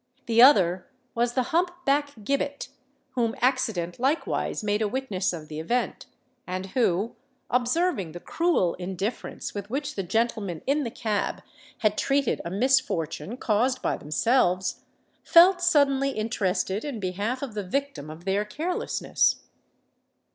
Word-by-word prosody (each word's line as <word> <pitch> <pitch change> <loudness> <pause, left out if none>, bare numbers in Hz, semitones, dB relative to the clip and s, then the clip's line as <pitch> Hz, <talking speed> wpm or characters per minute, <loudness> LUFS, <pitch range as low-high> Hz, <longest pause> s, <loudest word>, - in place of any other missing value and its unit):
The 230 0 +4
other 185 -9 +6 0.3
was 240 +1 0
the 255 - +2
hump 350 +2 +3 0.2
back 285 +1 +1
Gibbet, 280 +4 -2 0.4
whom 230 -3 0
accident 225 -9 0
likewise 270 -3 0
made 210 +1 0
a 215 - +2
witness 205 -6 -1
of 160 -3 -7
the 150 0 -6
event, 240 +10 -2 0.4
and 185 +1 -3
who, 220 -2 +1 0.4
observing 250 - +1
the 175 - -7
cruel 330 - +1
indifference 190 +5 -4
with 205 0 -6
which 285 +4 -3
the 195 - -2
gentlemen 200 -3 -1
in 290 +2 +1
the 235 - -2
cab 215 -3 -2 0.4
had 215 -2 +2
treated 275 -2 +1
a 170 - -4
misfortune 235 - 0
caused 250 +3 +1
by - - +1
themselves, 185 - +1 0.4
felt 355 +2 +6
suddenly 280 -5 +3
interested 215 -4 -1
in 280 -7 -4
behalf 205 +8 -2
of 260 -5 -5
the 210 - -2
victim 275 - -3
of 160 +3 -10
their 195 +2 +1
carelessness. 310 +12 0
230 Hz, 140 wpm, -26 LUFS, 190-275 Hz, 0.4 s, other